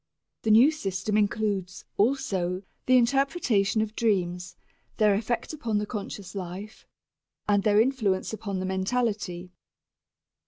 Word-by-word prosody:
The 220 - -1
new 235 +8 +7
system 200 -7 -3
includes, 205 -3 -1
also, 195 -7 0 0.2
the 255 0 +6
interpretation 245 - +2
of 220 0 -7
dreams, 180 -6 -1 0.4
their 210 -2 +4
effect 230 +8 -2
upon 235 -8 -2
the 210 - -1
conscious 200 -3 -6
life 195 +2 -7 0.6
and 205 -1 +3
their 205 +1 +3
influence 220 -6 +1
upon 200 -3 -4
the 185 - -3
mentality. 190 -2 -2
210 Hz, 120 wpm, -27 LUFS, 190-230 Hz, 0.6 s, new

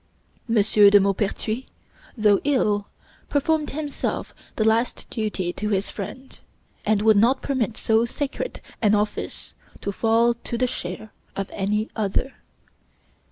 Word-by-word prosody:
M. 230 - +1
de 205 -1 +6
Maupertuis, 205 +5 -1 0.5
though 210 -2 +4
ill, 210 -8 +1 0.4
performed 300 +1 +1
himself 295 -1 -3 0.2
this 215 - +1
last 225 +2 +1
duty 205 -6 -2
to 210 - -3
his 200 -1 0
friend, 255 +6 -8 0.4
and 210 -1 +2
would 220 -1 +6
not 235 +6 +3
permit 250 -6 -1
so 220 +1 +3
sacred 285 - -4 0.2
an 210 -2 +4
office 210 0 -2 0.3
to 200 - -2
fall 230 +3 +3
to 235 0 -5
the 255 - +2
share 210 -2 -5 0.2
of 195 -1 -4
any 210 +2 0
other. 220 +5 -1
220 Hz, 130 wpm, -24 LUFS, 205-245 Hz, 0.5 s, de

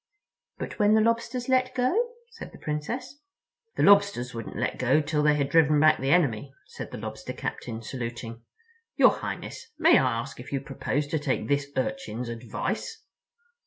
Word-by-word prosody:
"But - - -6
when 210 +1 +5
the 220 - +5
Lobsters 230 +2 0
let 255 -1 +2
go?" 405 - +1 0.2
said 455 - -10
the - - -13
Princess. 240 - -5 0.5
"The - - +1
Lobsters 200 -11 +4
wouldn't 115 -2 -7
let 125 - -2
go 130 +4 +3
till 150 0 0
they 150 0 +4
had 140 -2 0
driven 150 0 +4
back 155 +1 +5
the 135 - -1
enemy," 140 -5 +2
said - - -8
the - - -7
Lobster - - -6
Captain, 115 -2 -5
saluting. 115 -1 -6 0.5
"Your - - +6
Highness, 485 - -6
may - - +6
I 125 -3 +1
ask 115 - -7
if 125 - -10
you 140 - 0
propose 140 +1 -2
to 160 - 0
take 145 -3 -1
this 140 0 +1
Urchin's 130 -6 -3
advice?" 120 - -4
150 Hz, 170 wpm, -27 LUFS, -, 0.5 s, Your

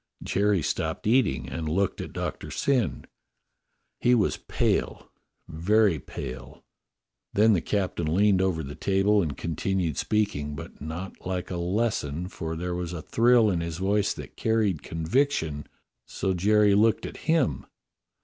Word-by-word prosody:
Jerry 100 -4 +1
stopped - - -2
eating 110 - +2
and 80 +4 -4
looked 95 +4 0
at - - -7
Doctor - - -4
Syn. 125 - 0 0.9
He 125 +1 +4
was 105 -5 +2
pale, - - -1 0.4
very 95 +2 +2
pale. 65 0 -8 0.7
Then 110 +2 +5
the 90 - +2
captain 90 -6 -1
leaned 95 +1 +4
over 90 -4 0
the 70 +1 -7
table 100 +4 +2
and 75 -5 -3
con 85 - -3
tinued 90 -4 -1
speaking, 75 -9 -1
but 70 - -10
not 80 +5 -7
like 90 -1 -3
a 90 - -2
lesson, 90 -3 -1
for 80 -2 -5
there 90 +2 -3
was 90 -1 -4
a 80 -3 -6
thrill 115 -2 +4
in 85 -2 -1
his 85 -1 -4
voice 100 +2 +1
that - - -9
carried 110 -8 +1
conviction, 80 - -1 0.4
so 95 - -1
Jerry 105 +3 +4
looked 110 +2 +3
at - - -7
him. 160 -6 +1
95 Hz, 150 wpm, -26 LUFS, 80-105 Hz, 0.9 s, Then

